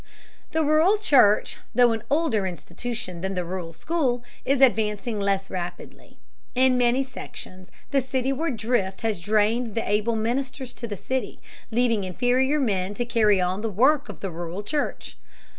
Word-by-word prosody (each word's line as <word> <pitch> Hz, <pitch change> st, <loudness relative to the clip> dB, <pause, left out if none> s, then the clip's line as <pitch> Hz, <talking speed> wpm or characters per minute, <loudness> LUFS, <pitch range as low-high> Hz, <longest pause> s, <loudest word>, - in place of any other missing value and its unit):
The 320 Hz, 0 st, +1 dB
rural 315 Hz, +7 st, +4 dB
church, 265 Hz, -, +4 dB, 0.2 s
though 245 Hz, -1 st, +6 dB
an 225 Hz, -1 st, -2 dB
older 280 Hz, -, +1 dB
institution 180 Hz, +3 st, -5 dB
than 190 Hz, +1 st, -3 dB
the 180 Hz, -1 st, -2 dB
rural 175 Hz, -1 st, -5 dB
school, 245 Hz, -, -1 dB, 0.2 s
is 275 Hz, 0 st, +2 dB
advancing 220 Hz, -3 st, +2 dB
less 195 Hz, -1 st, 0 dB
rapidly. 175 Hz, -1 st, -7 dB, 0.4 s
In 260 Hz, 0 st, +4 dB
many 250 Hz, +2 st, +3 dB
sections 185 Hz, -7 st, -9 dB, 0.2 s
the 275 Hz, -, +3 dB
cityward 265 Hz, +2 st, -1 dB
drift 215 Hz, -4 st, -1 dB
has 220 Hz, -5 st, -1 dB
drained 215 Hz, +3 st, +1 dB
the 225 Hz, -, -1 dB
able 210 Hz, +3 st, +1 dB
ministers 250 Hz, +3 st, -2 dB
to 235 Hz, -, -6 dB
the 205 Hz, -2 st, -5 dB
city, 260 Hz, +7 st, -3 dB, 0.3 s
leaving 230 Hz, -3 st, +1 dB
inferior 250 Hz, -, +1 dB
men 200 Hz, -6 st, 0 dB
to 240 Hz, -, -1 dB
carry 215 Hz, -4 st, +3 dB
on 185 Hz, +2 st, 0 dB
the 225 Hz, -, -1 dB
work 270 Hz, +8 st, +3 dB
of -, -, -9 dB
the 195 Hz, -, -3 dB
rural 175 Hz, +4 st, -5 dB
church. 295 Hz, +7 st, -3 dB
230 Hz, 160 wpm, -25 LUFS, 195-260 Hz, 0.4 s, though